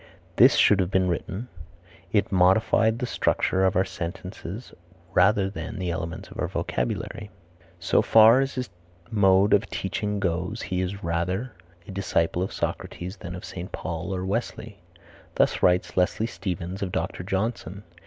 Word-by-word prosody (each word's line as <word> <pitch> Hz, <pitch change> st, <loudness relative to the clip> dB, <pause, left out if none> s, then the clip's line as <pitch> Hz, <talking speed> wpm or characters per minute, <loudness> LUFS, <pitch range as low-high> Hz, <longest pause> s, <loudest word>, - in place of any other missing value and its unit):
This -, -, +7 dB
should 105 Hz, -, +5 dB
have 90 Hz, -2 st, +1 dB
been 95 Hz, -1 st, +2 dB
written, 95 Hz, +6 st, -3 dB, 0.6 s
"It 105 Hz, -, +1 dB
modified 110 Hz, +4 st, +3 dB
the 125 Hz, -, -2 dB
structure 95 Hz, -5 st, +1 dB
of 95 Hz, -, +2 dB
our 95 Hz, +1 st, +3 dB
sentences 90 Hz, +5 st, -7 dB, 0.4 s
rather 100 Hz, +1 st, +4 dB
than 105 Hz, +2 st, -6 dB
the 90 Hz, -2 st, -2 dB
elements 85 Hz, -1 st, -5 dB
of -, -, -10 dB
our -, -, 0 dB
vocabulary." -, -, -3 dB, 0.5 s
"So -, -, +3 dB
far 115 Hz, +4 st, +7 dB
as 135 Hz, 0 st, -2 dB
his 125 Hz, -1 st, -4 dB, 0.4 s
mode 100 Hz, -1 st, +4 dB
of 100 Hz, 0 st, +3 dB
teaching 105 Hz, +1 st, -2 dB
goes 90 Hz, +4 st, -2 dB
he 90 Hz, 0 st, -2 dB
is 95 Hz, +2 st, -4 dB
rather 90 Hz, +8 st, -1 dB, 0.4 s
a -, -, -7 dB
disciple 90 Hz, -3 st, 0 dB
of 95 Hz, -, -2 dB
Socrates 90 Hz, +4 st, -4 dB
than 90 Hz, -1 st, -7 dB
of 90 Hz, -, -8 dB
St. 90 Hz, 0 st, -7 dB
Paul 85 Hz, +1 st, -4 dB
or 90 Hz, 0 st, -3 dB
Wesley." 105 Hz, 0 st, -4 dB, 0.6 s
Thus -, -, +2 dB
writes 90 Hz, 0 st, +2 dB
Leslie 95 Hz, +4 st, +1 dB
Stephens 95 Hz, -4 st, -5 dB
of 95 Hz, -2 st, -2 dB
Dr. -, -, -3 dB
Johnson. 100 Hz, +1 st, -3 dB
95 Hz, 155 wpm, -25 LUFS, 90-105 Hz, 0.6 s, This